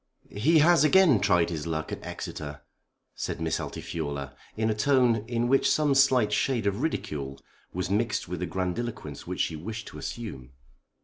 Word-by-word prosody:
"He 145 +12 +3
has 165 +1 +6
again 160 - +6
tried 85 -2 +2
his 80 -1 -4
luck 80 -1 -3
at - - -6
Exeter," 75 -1 -6 0.5
said - - -4
Miss 80 -1 -1
Altifiorla, 70 -4 -5 0.2
in 110 0 +1
a - - +2
tone 125 +1 +3
in 120 0 0
which 135 +2 +3
some 150 -2 +3
slight 130 -6 +4
shade 120 0 +1
of 100 0 0
ridicule 70 - -3 0.3
was 90 +1 -3
mixed 110 +4 0
with - - -4
the - - -2
grandiloquence 95 - -4
which - - -2
she 80 - -1
wished 110 +8 -6
to - - -10
assume. 65 - -7
105 Hz, 170 wpm, -27 LUFS, 80-125 Hz, 0.5 s, has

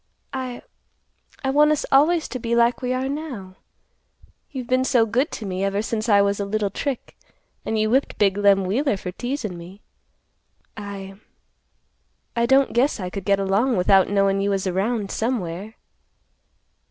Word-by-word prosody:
I—I 260 +1 -9
want 300 +2 +5
us 305 - 0
always 310 +4 +4
to 255 - -4
be 235 0 -1
like 235 +2 +3
we 250 -1 -2
are 255 +1 -1
now. 265 -11 -6 0.9
You've 260 -4 -6
been 255 +2 +2
so 245 -3 +3
good 245 +7 0
to 220 - -5
me 190 0 -3
ever 200 +1 0
since 225 0 -2
I 200 -1 +6
was 200 0 0
a - - 0
little 205 0 -1
trick, 270 +3 -4 0.5
and 220 - 0
you 215 0 +1
whipped 265 +3 +1
big 195 -2 +3
Lem 200 -1 +3
Wheeler 225 +4 0
for 180 -1 -6
teasin' 240 -4 -4
me. 185 +4 -12 0.9
I—I 200 +3 -9
don't 270 +1 +4
guess 250 +2 +2
I 180 -2 -4
could 195 -1 -6
get 200 -1 +3
along 200 +6 +1
without 190 +1 +4
knowin' 195 -1 +2
you 200 - 0
was 195 -1 -1
around 195 +3 -1
somewhere." 215 -3 -3
215 Hz, 160 wpm, -23 LUFS, 195-255 Hz, 0.9 s, I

